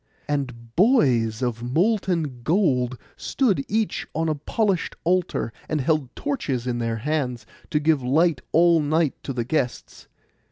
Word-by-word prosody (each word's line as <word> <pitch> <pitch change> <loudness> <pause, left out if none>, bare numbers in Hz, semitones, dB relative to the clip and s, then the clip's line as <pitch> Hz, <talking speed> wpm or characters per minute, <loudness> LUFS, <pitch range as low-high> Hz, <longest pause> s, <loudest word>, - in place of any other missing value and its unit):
And 125 -5 -4
boys 130 - +3
of 120 -2 -2
molten 165 - 0
gold 130 - +1 0.2
stood 210 - +1
each 220 0 -1
on 160 +1 0
a - - +2
polished 190 +5 -1
altar, 175 -9 0 0.2
and 155 - 0
held 140 -2 0
torches 150 - -2
in 120 -1 -1
their 115 -1 -1
hands, 130 -1 -2 0.2
to 150 - +1
give 150 -2 +2
light 145 +3 +2
all 170 0 +5
night 155 0 +1
to - - -5
the 120 -3 -2
guests. 125 -2 -3
145 Hz, 145 wpm, -24 LUFS, 125-170 Hz, 0.2 s, all